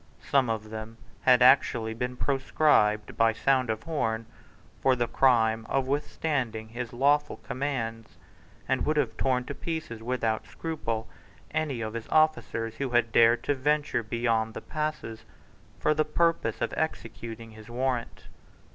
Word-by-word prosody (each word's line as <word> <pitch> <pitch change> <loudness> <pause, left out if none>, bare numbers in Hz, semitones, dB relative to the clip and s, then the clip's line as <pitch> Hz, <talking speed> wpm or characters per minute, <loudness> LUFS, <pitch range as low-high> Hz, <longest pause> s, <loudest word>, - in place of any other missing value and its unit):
Some 135 -4 +2
of 110 -1 -3
them 110 +1 -7 0.2
had 125 -1 +5
actually 120 -3 +4
been 125 +2 -4
proscribed 130 -6 +2
by 115 0 +3
sound 130 +1 +1
of 110 0 -2
horn 115 -8 -1 0.6
for 130 -1 +4
the 120 -1 0
crime 115 -3 +3
of 135 -1 +1
withstanding 130 -5 -2
his 120 0 -5
lawful 145 +4 +2
commands, 115 -5 -4 0.5
and 130 -1 +1
would 155 0 0
have 120 -7 0
torn 125 +1 +1
to 140 - -5
pieces 155 -8 -5
without 115 -2 -1
scruple 115 -9 -4 0.4
any 150 -6 -1
of 110 -1 -4
his 115 -1 -5
officers 120 -7 +1
who 140 -2 -2
had 120 -2 +2
dared 115 +1 +5
to 145 - +1
venture 145 0 0
beyond 115 0 -1
the - - -5
passes 150 -7 -4 0.6
for 150 - +3
the 155 0 +2
purpose 155 -7 0
of 120 - -1
executing 115 -6 -4
his 110 0 -13
warrant. 125 0 -2
120 Hz, 145 wpm, -28 LUFS, 115-140 Hz, 0.6 s, had